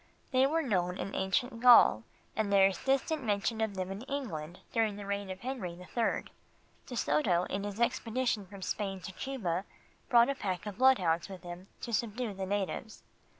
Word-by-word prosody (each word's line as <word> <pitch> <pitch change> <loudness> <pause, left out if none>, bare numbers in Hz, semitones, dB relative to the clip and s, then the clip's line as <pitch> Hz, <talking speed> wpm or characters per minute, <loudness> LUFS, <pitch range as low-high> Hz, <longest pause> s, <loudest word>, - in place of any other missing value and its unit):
They 260 0 +4
were 325 +3 +1
known 180 - 0
in 195 - -4
ancient 230 +6 0
Gaul, 240 - +8 0.3
and 215 -2 0
there 195 -1 +6
is 195 -2 0
distinct 275 +2 +1
mention 215 +1 0
of 220 -3 -1
them 185 0 -3
in 195 +2 -5
England 185 - -5
during 220 -3 +1
the 205 0 -7
reign 200 0 -3
of 185 0 -6
Henry 240 -9 -4
the 180 +1 -11
Third. 230 +4 -1 0.6
De 250 - -6
Soto 170 -1 +2
in 195 +1 -2
his 205 +1 -5
expedition 235 -3 0
from 195 0 -10
Spain 195 -1 -2
to 185 - -6
Cuba 190 -6 -3 0.5
brought 235 -2 +6
a - - +2
pack 195 -8 -3
of 205 0 -6
bloodhounds 185 -11 +4
with 190 -2 -9
him 175 +2 -8
to 235 - -5
subdue 225 +1 -1
the 190 0 -4
natives. 205 +2 -3
205 Hz, 190 wpm, -31 LUFS, 185-240 Hz, 0.6 s, Gaul